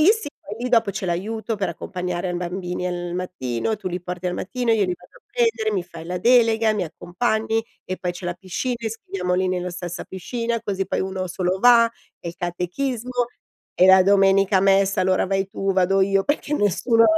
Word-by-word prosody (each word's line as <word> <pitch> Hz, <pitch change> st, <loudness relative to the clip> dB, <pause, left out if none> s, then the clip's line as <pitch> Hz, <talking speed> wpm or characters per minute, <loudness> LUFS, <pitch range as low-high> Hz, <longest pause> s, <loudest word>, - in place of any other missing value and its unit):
lì 365 Hz, +8 st, +7 dB
sì 440 Hz, -9 st, -4 dB
poi 210 Hz, -, -8 dB
lì -, -, 0 dB
dopo 230 Hz, -4 st, +4 dB
c'è 195 Hz, -, -5 dB
l'aiuto 215 Hz, +5 st, -2 dB
per 195 Hz, -3 st, -1 dB
accompagnare 180 Hz, +1 st, -4 dB
a -, -, -2 dB
bambini 180 Hz, 0 st, -3 dB
al 175 Hz, -1 st, -3 dB
mattino. 180 Hz, -, -2 dB
"Tu 195 Hz, -2 st, -4 dB
li 180 Hz, 0 st, -4 dB
porti 180 Hz, 0 st, -5 dB
al -, -, -2 dB
mattino, 245 Hz, +4 st, -2 dB
io 210 Hz, -3 st, +3 dB
li 180 Hz, -1 st, -1 dB
vado 485 Hz, -, -20 dB
a -, -, -38 dB
prendere. 455 Hz, -, +1 dB
Mi 190 Hz, -3 st, 0 dB
fai 170 Hz, -2 st, -10 dB
la 180 Hz, 0 st, -3 dB
delega, 225 Hz, -1 st, +4 dB
mi 190 Hz, -4 st, -1 dB
accompagni, 220 Hz, +7 st, -1 dB, 0.2 s
e 185 Hz, -, -4 dB
poi 180 Hz, -, -2 dB
c'è 175 Hz, +1 st, -10 dB
la 175 Hz, -, -2 dB
piscina, 190 Hz, +8 st, -3 dB
iscriviamoli 185 Hz, -4 st, -2 dB
nella 180 Hz, 0 st, -2 dB
stessa 175 Hz, 0 st, -6 dB
piscina 230 Hz, +5 st, -3 dB
così 195 Hz, -1 st, -2 dB
poi -, -, -1 dB
uno 190 Hz, 0 st, -2 dB
solo 180 Hz, +1 st, -1 dB
va. 235 Hz, -1 st, +6 dB, 0.3 s
E 170 Hz, -, -5 dB
il 170 Hz, -, -7 dB
catechismo 240 Hz, +8 st, -2 dB, 0.5 s
e 185 Hz, -, +8 dB
la 190 Hz, 0 st, +8 dB
domenica 195 Hz, 0 st, +4 dB
a -, -, +2 dB
messa 195 Hz, 0 st, +3 dB
allora 185 Hz, 0 st, +2 dB
vai 195 Hz, 0 st, 0 dB
tu, 195 Hz, 0 st, -1 dB
vado 190 Hz, +1 st, +3 dB
io 195 Hz, 0 st, +2 dB
perché 295 Hz, 0 st, -1 dB
nessuno" 230 Hz, +1 st, +3 dB
195 Hz, 205 wpm, -23 LUFS, 180-225 Hz, 0.5 s, e